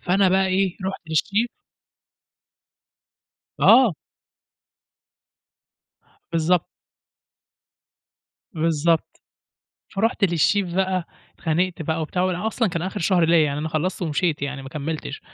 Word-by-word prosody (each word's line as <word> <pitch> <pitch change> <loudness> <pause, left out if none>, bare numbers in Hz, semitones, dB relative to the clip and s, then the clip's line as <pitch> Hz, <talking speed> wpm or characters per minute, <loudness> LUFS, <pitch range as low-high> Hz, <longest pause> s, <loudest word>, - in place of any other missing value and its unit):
فأنا 190 +2 +2
بقى 190 +1 +3
إيه، 190 -1 0
رُحت 190 +1 -3
للشيف 200 +9 +1 2.1
آه. 250 -7 +6 2.4
بالضبط. 165 +1 +2 1.9
بالضبط. 165 -2 0 0.7
فرُحت 220 +1 +1
للشيف 175 +1 +1
بقى 185 -1 0 0.3
اتخانقت 175 +1 -1
بقى 160 +1 -2
وبتاع 180 +3 -2
وأصلًا 200 +5 0
كان 170 -2 -3
آخر 190 +3 -4
شهر 175 0 +3
ليا 165 -1 +4
يعني 145 -1 -2
أنا 155 +2 -3
خلصت 170 +5 -2
ومشيت 160 -1 -1
يعني 140 -1 -4
ما 135 - -8
كملتش، 150 0 -5
175 Hz, 100 wpm, -23 LUFS, 160-190 Hz, 2.4 s, آه